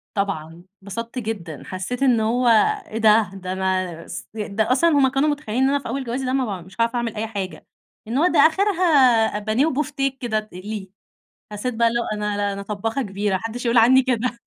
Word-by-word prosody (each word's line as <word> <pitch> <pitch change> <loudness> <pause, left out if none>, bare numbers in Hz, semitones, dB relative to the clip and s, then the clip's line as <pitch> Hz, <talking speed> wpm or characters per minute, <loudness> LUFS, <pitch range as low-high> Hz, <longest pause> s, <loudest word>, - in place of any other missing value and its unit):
طبعًا. 170 -4 -3 0.2
انبسطت 230 +5 -5
جدًا، 190 - -5
حسّيت 190 +8 -4
إن 250 -4 +4
هو 240 +3 +1 0.4
إيه 220 - -6
ده! 220 -3 +4
ده 185 -1 -5
أنا 185 -3 -2
ص - - -7
ده 215 +2 -1
أصلًا 335 +6 +4
هُم 285 -3 +4
كانوا 270 +3 +1
متخيّلين 265 -4 -1
إن 270 - +4
أنا 285 - +1
في - - -9
أول 265 +3 -3
جوازي 255 +2 -3
ده 255 - -1
ما 225 -9 -1
ب - - -14
مش 185 0 -15
هاعرَف 230 +1 +1
أعمل 235 -2 -2
أي 220 +1 -3
حاجة، 200 -4 -6 0.4
إن 235 +4 -2
هو 325 +5 +4
ده - - +2
آخِرها 375 +3 +3 0.6
أ - - -3
بانيه 215 +6 +1
وبُوفتيك 275 -2 -1
كده 225 -3 0
تقلِيه. 210 0 -7 0.7
حسّيت 225 +4 -3
بقى 230 +1 +3
اللي 235 +1 -1
هو - - -2
أنا 210 -1 -2
لأ 205 0 -1
أنا 200 0 -5
طبّاخة 220 +6 -3
كبيرة 200 -2 -2
ما 190 - -1
حدش 230 +2 -5
يقول 235 0 +3
عني 255 +4 +6
كده 250 -1 -1
225 Hz, 215 wpm, -22 LUFS, 200-255 Hz, 0.7 s, عني